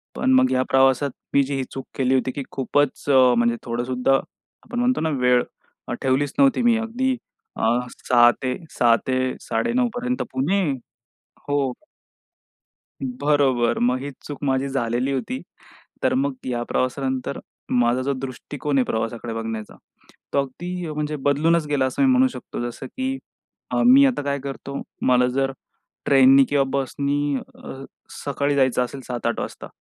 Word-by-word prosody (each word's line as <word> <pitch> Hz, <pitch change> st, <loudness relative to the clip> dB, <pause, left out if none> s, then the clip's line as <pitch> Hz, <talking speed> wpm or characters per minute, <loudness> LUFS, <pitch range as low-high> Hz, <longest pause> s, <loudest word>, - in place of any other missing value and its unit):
पण 260 Hz, -, +1 dB
मग 260 Hz, 0 st, +4 dB
या 130 Hz, -, +2 dB
प्रवासात 135 Hz, +1 st, +4 dB, 0.2 s
मी 140 Hz, -, +5 dB
जी 140 Hz, +1 st, -3 dB
ही 135 Hz, -, -1 dB
चूक 135 Hz, -, -6 dB
केली 130 Hz, -1 st, +1 dB
होती, 130 Hz, 0 st, +1 dB
की 140 Hz, -, -5 dB
खूपच 140 Hz, +1 st, 0 dB
म्हणजे 120 Hz, -3 st, +5 dB
थोडं 120 Hz, 0 st, -2 dB
सुद्धा 125 Hz, +1 st, +1 dB, 0.5 s
आपण 240 Hz, -, -5 dB
म्हणतो 250 Hz, +1 st, +2 dB
ना 160 Hz, -, +1 dB
वेळ 125 Hz, -1 st, +4 dB, 0.6 s
ठेवलीच 135 Hz, +1 st, +1 dB
नव्हती 275 Hz, -3 st, +4 dB
मी. 235 Hz, -1 st, +4 dB
अगदी 240 Hz, +4 st, -1 dB, 0.4 s
अ, -, -, -5 dB, 0.5 s
6 120 Hz, -1 st, +7 dB, 0.5 s
6 115 Hz, -1 st, +6 dB
ते 130 Hz, -, +1 dB, 0.3 s
9:30 245 Hz, +1 st, 0 dB
पर्यंत 250 Hz, +1 st, -2 dB
पुणे 160 Hz, +10 st, +1 dB, 0.9 s
हो. 140 Hz, -3 st, +1 dB, 1.3 s
बरोबर 130 Hz, -2 st, +1 dB
मग 125 Hz, +1 st, +2 dB
ही 145 Hz, -, -4 dB
चूक 145 Hz, -1 st, -8 dB
माझी 135 Hz, 0 st, +1 dB
झालेली 125 Hz, 0 st, -1 dB
होती. 255 Hz, -, -3 dB, 0.6 s
तर -, -, +2 dB
मग 270 Hz, +1 st, 0 dB
या 120 Hz, -1 st, -1 dB
प्रवासानंतर 130 Hz, +1 st, -1 dB, 0.3 s
माझा 120 Hz, +1 st, +2 dB
जो 140 Hz, +2 st, 0 dB
दृष्टिकोन 135 Hz, +2 st, -3 dB
आहे 130 Hz, -, +3 dB
प्रवासाकडे 115 Hz, +1 st, -3 dB
बघण्याचा 115 Hz, -1 st, -5 dB, 0.6 s
तो -, -, +2 dB
अगदी 170 Hz, +6 st, -3 dB
म्हणजे 150 Hz, 0 st, -2 dB
बदलूनच 150 Hz, +4 st, +2 dB
गेला, 145 Hz, -3 st, +1 dB
असं 130 Hz, -, -1 dB
मी 270 Hz, -, +5 dB
म्हणू 255 Hz, 0 st, +5 dB
शकतो. 245 Hz, -, -7 dB
जसं 130 Hz, -, -9 dB
की 265 Hz, -, -3 dB, 0.5 s
अ, -, -, +1 dB
मी 270 Hz, +3 st, +8 dB
आता 250 Hz, -, 0 dB
काय 140 Hz, 0 st, -1 dB
करतो 140 Hz, 0 st, -6 dB, 0.3 s
मला 125 Hz, -1 st, +4 dB
जर 135 Hz, 0 st, +1 dB, 0.5 s
ट्रेननी 135 Hz, 0 st, +7 dB
किंवा 140 Hz, -1 st, +2 dB
बसनी 140 Hz, +1 st, -1 dB
अ, 135 Hz, +1 st, -10 dB, 0.4 s
सकाळी 140 Hz, 0 st, 0 dB
जायचं 130 Hz, -2 st, +3 dB
असेल 135 Hz, +2 st, -7 dB
7-8 120 Hz, -1 st, -2 dB
वाजता -, -, -6 dB
135 Hz, 150 wpm, -23 LUFS, 130-150 Hz, 1.3 s, मी